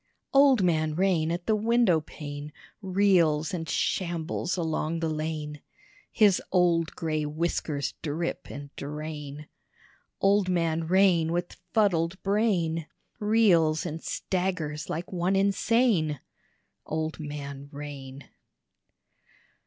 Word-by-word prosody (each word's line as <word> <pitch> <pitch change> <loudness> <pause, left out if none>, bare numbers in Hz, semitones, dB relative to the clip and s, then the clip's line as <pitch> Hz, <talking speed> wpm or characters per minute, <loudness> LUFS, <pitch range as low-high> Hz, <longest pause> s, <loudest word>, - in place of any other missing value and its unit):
Old 275 -6 +6
Man 155 -3 +1
Rain 175 -3 +2
at 175 +1 -3
the 220 - +2
windowpane 160 -10 0 0.3
Reels 180 -6 +2
and 165 -3 -4
shambles 175 +1 -1
along 160 -1 -1
the 165 - -1
lane: 155 -1 -4 0.5
His 205 -5 +4
old 170 -3 +2
gray 155 -3 -1
whiskers 150 -1 -2
drip 160 +2 -3
and 140 0 -9
drain: 150 0 -6 0.7
Old 195 -1 +3
Man 165 -2 0
Rain 180 -3 +4
with 175 +1 -3
fuddled 185 -4 +2
brain 185 -6 +1 0.3
Reels 185 -8 +3
and 165 -1 -4
staggers 180 -5 -2
like 170 +3 -4
one 180 +2 +1
insane. 195 - +2 0.6
Old 160 +1 -3
Man 140 -2 -6
Rain. 140 -2 -8
165 Hz, 105 wpm, -27 LUFS, 155-190 Hz, 0.7 s, Old